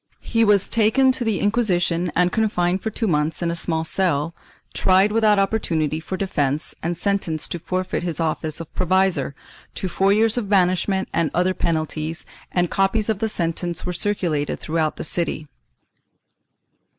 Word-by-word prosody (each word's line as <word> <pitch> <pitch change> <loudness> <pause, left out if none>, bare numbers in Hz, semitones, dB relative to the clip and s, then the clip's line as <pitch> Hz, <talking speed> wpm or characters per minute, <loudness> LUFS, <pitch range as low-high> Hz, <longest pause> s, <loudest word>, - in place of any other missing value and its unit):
He 230 0 +1
was 205 -3 +3
taken 235 +4 +4
to 255 - -2
the 220 -4 0
Inquisition 180 -6 +1
and 180 0 +3
confined 190 -4 +1
for 220 - -2
two 225 +2 -3
months 155 -2 0
in 170 - 0
a - - -2
small 160 -1 -1
cell, 165 -3 0 0.4
tried 190 +2 +3
without 215 -1 +3
opportunity 165 -7 0
for 180 +3 -5
defence 150 -7 -1
and 170 +1 -2
sentenced 180 -5 -1
to 175 - -3
forfeit 185 +2 -2
his 175 -2 -3
office 155 -1 -2
of 165 - -9
provisor, 185 -6 +1 0.4
to 190 - -3
four 195 +2 +2
years 225 +3 +3
of 205 -4 -5
banishment 190 0 +2
and 165 -2 +1
other 180 +1 +2
penalties, 160 -1 -2 0.3
and 175 -1 0
copies 205 +3 +1
of 215 -3 0
the 220 - 0
sentence 170 -2 -2
were 180 - -2
circulated 175 -6 -1
through 165 +1 -2
out 155 -1 0
the - - -6
city. 165 -1 -1
180 Hz, 165 wpm, -22 LUFS, 165-205 Hz, 0.4 s, taken